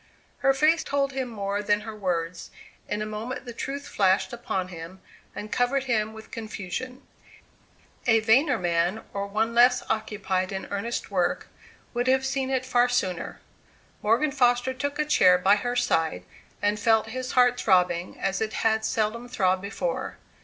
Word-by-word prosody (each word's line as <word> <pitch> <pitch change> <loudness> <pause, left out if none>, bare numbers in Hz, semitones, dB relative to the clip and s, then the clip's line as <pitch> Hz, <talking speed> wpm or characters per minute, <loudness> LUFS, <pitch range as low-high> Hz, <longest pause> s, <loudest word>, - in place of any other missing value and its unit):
Her 270 - +4
face 310 +4 +3
told 280 -1 0
him 265 -1 -3
more 200 -2 -2
than 205 0 +1
her 220 0 -7
words. 180 -4 -3 0.4
In 210 +1 -1
a - - -3
moment 225 +5 -5
the 240 - -7
truth 280 +4 -5
flashed 195 +3 +2
upon 190 -6 -3
him, 170 +1 -9 0.4
and 210 - -7
covered 260 +2 +1
him 220 -4 0
with 220 0 -12
confusion. 230 +4 -6 1.0
A 225 -2 +5
vainer 250 +5 +3
man, 175 +3 0
or 200 0 -3
one 220 +3 0
less 245 +1 +5
occupied 200 -4 -1
in 190 -1 -4
earnest 205 +2 -3
work, 180 -3 0 0.4
would 245 +1 -1
have 265 +1 +3
seen 270 -1 -1
it 260 -1 0
far 245 -1 +3
sooner. 185 -7 -2 0.6
Morgan 235 +8 +2
Foster 245 -1 +2
took 285 +2 -3
a 300 - +1
chair 180 -11 +5
by 190 +3 +4
her 245 +4 -2
side, 160 - +1 0.4
and 205 +1 +1
felt 220 0 +3
his 255 +2 -4
heart 245 -1 +4
throbbing 180 -4 +2
as 195 +2 -1
it 220 0 -1
had 220 0 +1
seldom 225 +2 -1
throbbed 185 -6 +1
before. 205 - -3
220 Hz, 165 wpm, -26 LUFS, 200-255 Hz, 1.0 s, A